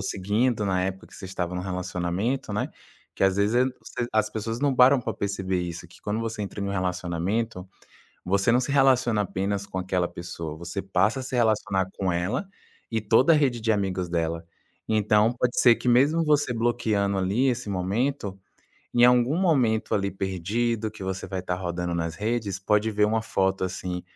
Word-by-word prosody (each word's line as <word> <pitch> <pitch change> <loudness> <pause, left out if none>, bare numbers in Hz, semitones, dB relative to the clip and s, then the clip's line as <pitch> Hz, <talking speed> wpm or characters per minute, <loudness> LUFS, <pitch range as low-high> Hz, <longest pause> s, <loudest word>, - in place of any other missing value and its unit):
seguindo 105 +4 0
na 95 -2 +1
época 95 0 -5
que - - -14
vocês 95 -1 -8
tavam 90 0 -2
num 90 - -3
relacionamento, 90 +6 -2
né, 105 - -1 0.4
que - - 0
às 95 -1 +3
vezes, 105 +4 +2
eh 125 - +5 0.2
você 120 - -4
as 110 - +2
pessoas 115 +3 -4
não 145 -2 +2
param 130 +2 +6
pra - - -3
perceber 95 -2 -2
isso, 85 -1 -6
que - - -18
quando 105 +2 -2
você 115 -2 -3
entra 100 0 -6
num 100 - -2
relacionamento, 90 +2 -2 0.6
você 100 +5 +2
não 125 - +3
se 140 - -3
relaciona 130 -5 +3
apenas 100 +1 -2
com 95 - -6
aquela 90 -1 0
pessoa, 85 -3 -7
você 85 +4 -5
passa 95 +6 +1
a 130 - -4
se 130 - -4
relacionar 105 -5 +1
com 95 -2 0
ela 95 - -1 0.4
e 115 -1 -1
toda 115 +9 +4
a - - +5
rede 130 -5 +2
de 115 - -3
amigos 95 -3 -1
dela. 85 -1 -2 0.4
Então, 110 +1 +3
pode 125 0 -1
ser 120 -2 +7
que 125 - -6
mesmo 145 +7 +4
você 145 -4 +2
bloqueando, 110 -4 0
ali, 100 +8 +1
esse 120 -3 -1
momento, 100 +3 -1 0.6
em 120 - +4
algum 125 +4 +5
momento, 130 - +2
ali, 100 -1 +1
perdido 105 +5 -2
que 105 -3 -10
você 95 0 -4
vai 95 0 -4
tá 90 0 -3
rodando 90 -1 -3
nas 85 -1 -2
redes, 105 -2 -2
pode 105 +2 +2
ver 105 0 +1
uma 110 +1 +1
foto, 95 -3 0
assim, 90 -1 -4
100 Hz, 190 wpm, -26 LUFS, 95-120 Hz, 0.6 s, ser